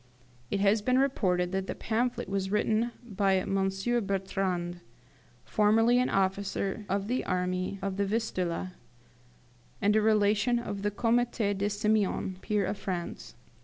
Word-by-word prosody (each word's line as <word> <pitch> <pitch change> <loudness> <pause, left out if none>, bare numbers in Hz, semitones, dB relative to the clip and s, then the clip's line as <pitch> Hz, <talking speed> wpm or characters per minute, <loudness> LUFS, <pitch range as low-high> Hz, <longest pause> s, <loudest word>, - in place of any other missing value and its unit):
It 200 - -1
has 205 +2 +3
been 255 +4 +2
reported 185 -10 +1
that 190 0 -2
the - - -3
pamphlet 240 +2 -1
was 195 -1 -2
written 215 +3 +1
by 200 -4 +1
M. 195 +1 0 0.3
Bertrand, 190 -3 -2 0.7
formerly 225 +3 +4
an 250 - +1
officer 195 +1 -1
of 195 +1 -1
the 250 +3 0
army 185 +1 -1
of 195 -1 -2
the 200 - +1
Vistula, 185 -5 -2 1.1
and 205 +1 +2
a 220 - +4
relation 215 +2 +3
of 205 -4 -4
the 205 - +1
Comte 235 +3 +1
de 205 -2 0
Simeon, 205 -2 0
peer 210 -2 0
of 200 +2 -3
France. 180 -3 -5
200 Hz, 140 wpm, -29 LUFS, 190-220 Hz, 1.1 s, formerly